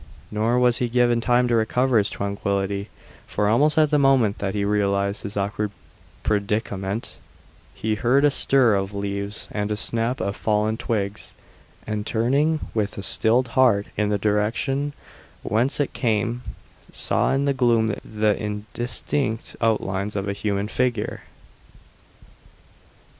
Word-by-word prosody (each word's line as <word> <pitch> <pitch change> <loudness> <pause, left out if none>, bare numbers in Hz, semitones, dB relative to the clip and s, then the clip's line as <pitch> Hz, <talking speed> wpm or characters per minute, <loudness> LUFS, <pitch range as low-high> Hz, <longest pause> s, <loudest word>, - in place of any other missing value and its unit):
Nor 110 +3 +1
was 125 -1 +3
he 125 - 0
given 120 0 +2
time 125 +1 +3
to 120 - 0
recover 120 +2 +2
his 100 - 0
tranquillity, 100 0 -2 0.4
for 105 - 0
almost 145 +9 +3
at 155 -2 +4
the 150 - +3
moment 130 -7 +3
that 100 0 -2
he 100 -1 0
realized 100 -1 0
his 100 +1 -6
awkward 105 +1 -1 0.5
predicament 100 0 -2 0.6
he 110 0 -1
heard 125 +6 +3
a 145 - +4
stir 130 -5 +3
of 100 0 -1
leaves 100 +1 -4
and 105 0 -2
a 105 - -1
snap 115 +4 +1
of 100 0 -2
fallen 110 0 0
twigs, 105 -3 -3 0.5
and 105 -1 -3
turning 140 +8 +1
with 105 -2 -2
a 100 - -5
stilled 115 +6 +3
heart 115 -5 +3
in 105 0 0
the 105 - +1
direction 115 +8 0 0.5
whence 120 +7 0
it 145 - -1
came, 115 +1 0 0.5
saw - - 0
in 135 +1 +1
the 140 - +2
gloom 115 -4 +2
the 105 -1 0
indistinct 110 +3 -2
outlines 105 -3 0
of 100 0 -2
a 100 - -1
human 100 0 -2
figure. 120 -2 -1
110 Hz, 140 wpm, -23 LUFS, 100-125 Hz, 0.6 s, at